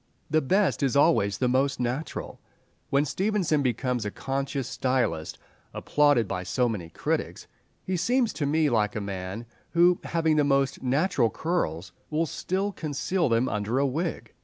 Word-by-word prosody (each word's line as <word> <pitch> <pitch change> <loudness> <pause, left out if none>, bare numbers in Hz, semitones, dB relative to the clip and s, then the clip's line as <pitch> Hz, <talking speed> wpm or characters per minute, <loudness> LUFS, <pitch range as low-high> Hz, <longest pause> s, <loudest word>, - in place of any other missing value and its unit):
The 155 0 +3
best 190 +7 +1
is 140 -1 +1
always 140 -10 +3
the 125 - +1
most 130 +2 +1
natural. 125 +5 -3 0.5
When 140 +2 +2
Stevenson 185 -3 0
becomes 125 -2 -1
a 105 - -2
conscious 135 +2 -3
stylist, 120 -12 -1 0.4
applauded 145 -7 +3
by 95 -1 -3
so 125 +7 0
many 100 -8 -4
critics, - - -3 0.4
he 185 - -2
seems 235 +7 +1
to 145 - -2
me 155 +1 +2
like 110 -5 +1
a - - -1
man 100 +2 -5 0.3
who, 175 +1 +5
having 160 -2 +1
most 135 -1 +1
natural 135 -1 +2
curls, 105 - -2 0.2
will 160 +2 +1
still 190 +5 -2
conceal 165 0 -1
them 115 +2 +2
under 105 +4 -1
a 140 - +3
wig. 160 +5 -3
135 Hz, 155 wpm, -26 LUFS, 115-160 Hz, 0.5 s, who